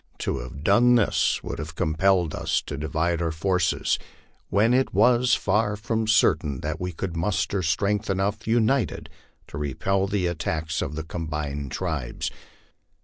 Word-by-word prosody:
To - - -2
have 65 +3 -8
done 120 +7 +5
this 115 -4 +2
would - - -5
have 80 +2 -6
compelled 85 +1 +2
us - - 0
to 75 - -6
divide 80 +3 -1
our 85 -1 0
forces, 90 +3 0 0.5
when 110 +5 +3
it 130 +1 +1
was 125 0 +4
far 105 +1 +1
from 110 +1 -2
cer 110 - +5
tain 70 -3 -5
that - - -4
we 90 0 -2
could 85 +1 -5
muster 95 +2 0
strength 100 +6 0
enough 100 +3 -1
united 115 - +1 0.4
to 70 - -6
repel 95 +7 0
the 100 -2 0
attacks 80 -1 -2
of 75 - -3
the 80 - -4
combined 75 -4 -4
tribes. 80 -9 -3
90 Hz, 155 wpm, -25 LUFS, 80-105 Hz, 0.5 s, done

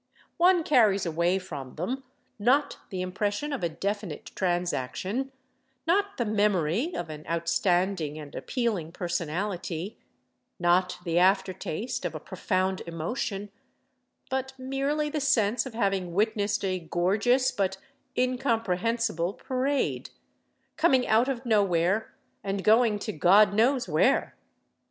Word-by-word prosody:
One 355 0 +5
carries 215 -11 +4
away 170 +3 +1
from 145 -9 -7
them, 250 +12 -3 0.4
not 260 +7 +2
the 185 -1 -3
impression 205 +9 -2
of 270 - -4
a 170 - +1
definite 200 0 -4
transaction, 180 - -2 0.5
not 400 +4 +1
the 240 - 0
memory 210 - +1
of 170 -2 -4
an 155 0 -8
outstanding 170 -1 0
and 150 -2 -9
appealing 210 -11 -2
personality, 175 +1 -3 0.6
not 180 +1 +2
the 170 -1 +1
after 190 +1 +3
taste 210 +8 -4
of - - -3
a - - -4
profound 190 -2 -1
emotion, 195 +4 -3 0.8
but 265 0 -2
merely 275 +3 -1
the 305 -1 -2
sense 235 -2 +2
of 235 - -10
having 195 -5 -1
witnessed 205 -1 +1
a 185 -1 0
gorgeous 205 +10 +2
but 190 -3 -1 0.4
incomprehensible 230 - 0
parade, 265 +4 -1 0.7
coming 270 -6 +3
out 230 +4 +3
of 260 -1 -3
nowhere 200 -2 +2 0.3
and 195 -1 -2
going 220 0 +4
to 215 - -4
God 190 +5 +5
knows 245 +4 +2
where. 175 - +2
200 Hz, 125 wpm, -27 LUFS, 175-250 Hz, 0.8 s, One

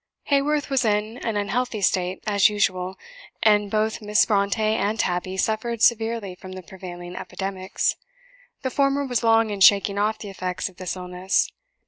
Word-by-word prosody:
Haworth 285 +1 +1
was 270 -2 +2
in 215 +2 0
an 225 -3 -2
unhealthy 215 +3 -1
state, 185 -1 0
as 205 -1 +4
usual; 190 -3 -1 0.5
and 210 -1 +4
both 215 +2 0
Miss 210 0 +3
Brontë 200 -1 +1
and 215 0 0
Tabby 185 0 -1
suffered 220 +3 -1
severely 225 -4 +2
from 185 +1 -11
the 185 0 -8
prevailing 175 -1 -9
epidemics. 190 0 -2 0.7
The 260 - -1
former 280 0 +1
was 245 -3 -1
long 225 -1 +4
in 200 -1 -5
shaking 200 +1 +5
off 215 +1 +1
the 205 - -8
effects 185 0 -3
of 180 - -21
this 185 -2 -4
illness. 180 +1 -1
205 Hz, 160 wpm, -24 LUFS, 190-225 Hz, 0.7 s, shaking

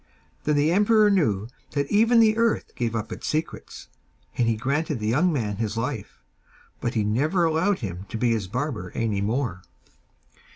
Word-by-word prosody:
Then 150 - +2
the 145 +2 +3
emperor 210 +2 +4
knew 110 - +1 0.3
that 140 -1 0
even 230 +3 +5
the 220 -1 +5
earth 230 0 0
gave 115 -2 -2
up 110 -1 -3
its - - -6
secrets, 155 +1 -4 0.5
and 120 - +1
he 115 - +2
granted 140 +4 -1
the 105 - -4
young 150 +12 +2
man 110 -9 -2
his 110 0 -2
life, 115 - -4 0.6
but 120 - -3
he 110 - +2
never 145 - +1
allowed 165 +3 +1
him 95 -2 -6
to 115 - -4
be 120 +1 +1
his 110 -5 -1
barber 120 -4 -3
any 110 -3 -1
more. 110 -3 -1
125 Hz, 175 wpm, -25 LUFS, 110-165 Hz, 0.6 s, even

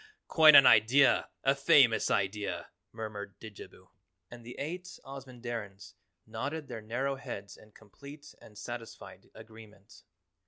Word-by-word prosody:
Quite 155 -2 +6
an 135 - +9
idea, 125 +7 +4
a 135 - +3
famous 135 -4 +3
idea!" 100 0 -3 0.2
murmured 105 -3 -8
Didjabo, 110 -2 -13 0.4
and 120 -1 -12
the 120 +2 -11
eight 175 +6 -6 0.2
Ozamandarins 120 -7 -9 0.3
nodded 140 +7 -6
their 115 -3 -8
narrow 130 +5 -3
heads 100 -7 -9
in 110 - -19
complete 140 +7 -14
and 105 - -16
satisfied 120 0 -10
agreement. 110 -2 -16
115 Hz, 120 wpm, -30 LUFS, 105-135 Hz, 0.4 s, an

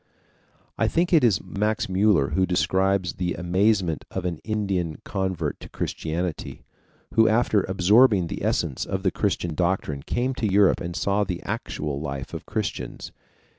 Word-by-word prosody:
I 110 - +3
think 170 +10 +1
it 160 - +6
is 110 -6 +3
Max 105 +2 -1
Müller 95 -6 +2
who 95 0 +2
describes 95 0 +1
the 90 -1 -2
amazement 90 -1 +1
of 95 -1 -4
an 85 -3 -2
Indian 95 -7 -2
convert 95 -6 -2
to - - -11
Christianity, 80 +1 -4 0.5
who 110 0 +5
after 110 -2 +3
absorbing 100 +2 +4
the 80 - -5
essence 65 - 0
of 95 -1 -3
the 95 - +2
Christian 90 -5 -1
doctrine 85 -4 -1
came 125 - -1
to 110 -6 -1
Europe 100 0 +4
and 85 0 -5
saw 100 +2 +1
the 90 -3 -4
actual 75 -2 -3
life 70 -4 -5
of - - -7
Christians. - - -4
95 Hz, 155 wpm, -24 LUFS, 85-105 Hz, 0.5 s, it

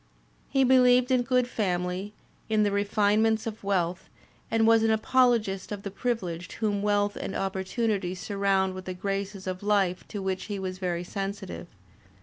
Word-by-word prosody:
He 270 -1 +3
beheved 250 0 +5
in 255 -1 +4
good 250 0 +1
family, 185 -2 -2 0.4
in 215 -1 +3
the 205 - +1
re 200 0 +1
finements 215 +2 +2
of 220 -2 -6
wealth, 185 -3 -1 0.4
and 225 0 +2
was 225 0 +5
an 225 - +2
apologist 220 -4 +2
of 205 -1 -5
the 200 - -5
privileged 185 -7 -3
whom 205 -3 -1
wealth 205 0 +1
and - - -5
opportunity 195 0 -1
surround 195 -1 0
with 185 0 -8
the 185 - -5
graces 195 +1 -3
of 185 -1 -4
life 200 -3 +1
to 210 - -5
which 190 -1 -2
he 205 -2 -4
was 185 -1 -5
very 175 -2 -2
sensitive. 195 -1 -5
200 Hz, 165 wpm, -27 LUFS, 190-220 Hz, 0.4 s, beheved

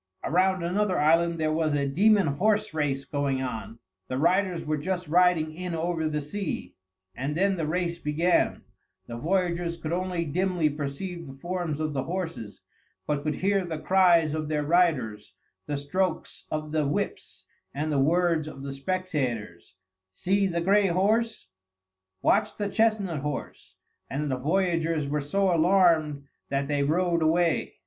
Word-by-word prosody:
Around 185 +1 +2
another 185 +2 0
island 165 +3 +3
there 155 -1 0
was 155 -2 +1
a 140 -1 +1
demon 200 +8 +4
horse 205 +7 +1
race 140 -3 -1
going 140 -2 -1
on; 115 -2 -5 0.3
the 130 - -3
riders 180 +3 +1
were 155 0 -1
just 180 +3 -3
riding 170 -1 +3
in 180 +1 -4
over 165 -1 -1
the 150 -1 -2
sea, 190 +5 -5 0.4
and 140 +8 -3
then 195 +1 +2
the 165 -4 -2
race 170 +1 -1
began; 165 +4 +1 0.4
the 115 - -7
voyagers 170 +3 -1
could 165 0 -4
only 180 -1 -1
dimly 175 0 0
perceive 155 +4 -5
the 135 - -10
forms 170 0 -3
of 155 -1 -2
the 135 -1 -2
horses, 165 - -5 0.4
but 145 -1 -1
could 150 0 -2
hear 195 +2 +1
the 165 -3 -4
cries 170 -3 +4
of 155 -1 -2
their 150 -1 0
riders, 145 -10 +1 0.3
the 145 -1 -2
strokes 170 +5 -2
of 155 0 -4
the 155 -2 +1
whips, 145 - -4 0.3
and 150 +2 -3
the 145 - +1
words 165 +1 +2
of 135 -3 -9
the 140 0 -5
spectators, 135 - -3 0.4
"See 195 - +1
the 170 -2 -1
gray 200 +3 +4
horse!" 215 - +1 0.8
"Watch 205 - +2
the 205 -1 -2
chestnut 210 -7 +1
horse!" 145 0 -6 0.3
and 145 +1 -2
the 130 - 0
voyagers 165 -1 0
were 150 +1 -1
so 190 +5 +1
alarmed 165 -4 +3 0.3
that 140 0 -1
they 145 -1 0
rowed 170 +3 +1
away. 165 +1 +1
165 Hz, 155 wpm, -27 LUFS, 145-180 Hz, 0.8 s, demon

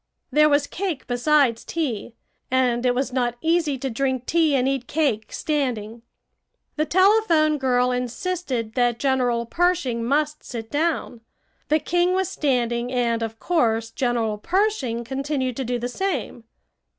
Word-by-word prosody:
There 305 0 +5
was 285 0 +3
cake 350 -4 -4
besides 245 -1 +2
tea, 245 -8 -3 0.3
and 250 -1 +2
it 245 - +2
was 260 0 -1
not 240 -2 0
easy 320 -3 +1
to 270 - -3
drink 260 +1 -1
tea 320 -2 +2
and 260 -1 +2
eat 270 -2 -1
cake 270 -9 0
standing. 240 -7 -2 0.7
The 305 0 0
telephone 360 -6 +4
girl 250 -1 +2
insisted 250 -1 -3
that 245 -2 +1
General 250 -3 +1
Pershing 275 -6 0
must 300 +4 0
sit 225 -2 -7
down. 295 -6 -1 0.5
The 305 - +4
king 350 +4 +1
was 380 -1 0
standing, 245 -3 0
and 235 -2 0
of 225 0 -4
course, 225 -10 +1
General 235 -5 -1
Pershing 340 - 0
continued 265 0 -2
to 270 - -1
do 245 0 -1
the 240 +1 -3
same. 250 -5 -3
260 Hz, 145 wpm, -23 LUFS, 240-310 Hz, 0.7 s, There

